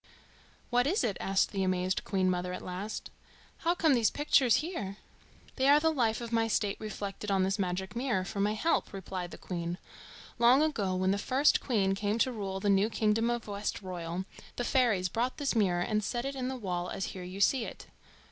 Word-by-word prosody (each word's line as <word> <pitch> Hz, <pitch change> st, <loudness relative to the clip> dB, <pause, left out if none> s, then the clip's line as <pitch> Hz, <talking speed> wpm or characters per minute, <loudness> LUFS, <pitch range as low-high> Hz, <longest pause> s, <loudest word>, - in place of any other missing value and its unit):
"What 245 Hz, +2 st, +3 dB
is 360 Hz, +1 st, +1 dB
it?" 215 Hz, -5 st, 0 dB
asked 195 Hz, 0 st, +1 dB
the 195 Hz, -, -2 dB
amazed 185 Hz, 0 st, 0 dB
Queen 190 Hz, -1 st, 0 dB
mother 180 Hz, 0 st, -1 dB
at -, -, -6 dB
last. 190 Hz, +4 st, -5 dB, 0.5 s
"How 340 Hz, +1 st, +1 dB
come 320 Hz, -4 st, +3 dB
these 235 Hz, -4 st, +3 dB
pictures 270 Hz, -5 st, +3 dB
here?" 205 Hz, -, -5 dB, 0.6 s
"They 265 Hz, 0 st, +2 dB
are 290 Hz, +1 st, +7 dB
the 320 Hz, +1 st, +2 dB
life 235 Hz, -5 st, +1 dB
of 235 Hz, -1 st, -6 dB
my 225 Hz, -1 st, +2 dB
state 205 Hz, -2 st, 0 dB
reflected 210 Hz, -1 st, -5 dB
on 195 Hz, -1 st, +2 dB
this 195 Hz, +2 st, 0 dB
magic 190 Hz, +1 st, -2 dB
mirror 235 Hz, -7 st, 0 dB
for 200 Hz, -, -5 dB
my 205 Hz, +1 st, +2 dB
help," 325 Hz, -1 st, 0 dB
replied 190 Hz, -2 st, -5 dB
the -, -, -10 dB
Queen. 170 Hz, -1 st, -4 dB, 0.6 s
"Long 245 Hz, +5 st, +6 dB
ago, 210 Hz, -12 st, 0 dB
when 185 Hz, +1 st, +1 dB
the 200 Hz, -, 0 dB
first 265 Hz, +7 st, +3 dB
queen 200 Hz, -7 st, +1 dB
came 205 Hz, +2 st, -1 dB
to 255 Hz, +2 st, +2 dB
rule 195 Hz, -4 st, -4 dB
the 205 Hz, -, -2 dB
new 200 Hz, +2 st, +4 dB
kingdom 225 Hz, +1 st, +1 dB
of 240 Hz, -1 st, -2 dB
Westroyal, 185 Hz, -4 st, -4 dB, 0.3 s
the 245 Hz, -, -2 dB
fairies 235 Hz, -8 st, +2 dB
brought 235 Hz, +7 st, -1 dB
this 285 Hz, -4 st, -1 dB
mirror 185 Hz, -5 st, +2 dB
and 210 Hz, +2 st, 0 dB
set 240 Hz, +4 st, -2 dB
it 275 Hz, -, -2 dB
in 260 Hz, -2 st, -3 dB
the 260 Hz, -, -3 dB
wall 180 Hz, -5 st, -3 dB
as 195 Hz, -, -3 dB
here 185 Hz, -, -7 dB
you 180 Hz, +2 st, -7 dB
see 235 Hz, +4 st, +3 dB
it. -, -, -9 dB
205 Hz, 205 wpm, -30 LUFS, 190-245 Hz, 0.6 s, are